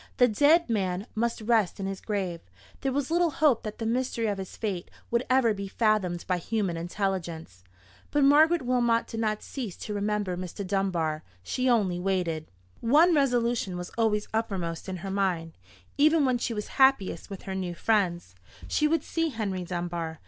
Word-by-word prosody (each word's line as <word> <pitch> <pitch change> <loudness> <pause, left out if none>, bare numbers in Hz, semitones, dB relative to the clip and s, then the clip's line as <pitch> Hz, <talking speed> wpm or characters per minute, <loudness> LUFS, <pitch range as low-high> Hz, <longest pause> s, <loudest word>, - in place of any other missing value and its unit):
The 245 - +6
dead 295 +9 +4
man 195 -4 -1
must 230 +1 -1
rest 215 -3 +1
in 195 - -3
his 195 -1 -4
grave: 190 -5 -2 0.4
there 270 - -1
was 280 +2 -1
little 345 0 +3
hope 295 -6 +3
that 215 -1 -6
the 225 - -4
mystery 235 0 0
of 205 -2 -1
his 190 - -7
fate 195 -6 -3 0.2
would 235 +1 +2
ever 255 -3 +4
be 200 -1 -5
fathomed 195 -5 0
by 180 -1 +1
human 195 -1 -1
intelligence. 170 - -4 0.5
But 290 - +2
Margaret 310 +3 +5
Wilmot 240 -2 +2
did 225 - -6
not 215 -1 -1
cease 235 -10 -6
to 210 - -5
remember 205 -2 -1
Mr. 185 +3 -5
Dunbar. 180 -5 0 0.2
She 255 - 0
only 195 -7 +2
waited. 180 -4 -1 0.3
One 305 +9 +5
resolution 240 - +1
was 180 0 -6
always 215 -2 +1
uppermost 190 -6 -2
in 185 - -3
her 195 - -3
mind, 180 -5 -1 0.4
even 310 0 +5
when 255 -2 +1
she 235 -1 -2
was 210 - -4
happiest 265 -7 +3
with 195 -2 -8
her 190 - -5
new 185 -2 -3
friends. 175 - 0 0.3
She 300 - +2
would 320 -1 +1
see 330 -1 -1
Henry 200 -8 -3
Dunbar. 170 -2 -4
210 Hz, 180 wpm, -27 LUFS, 180-245 Hz, 0.5 s, The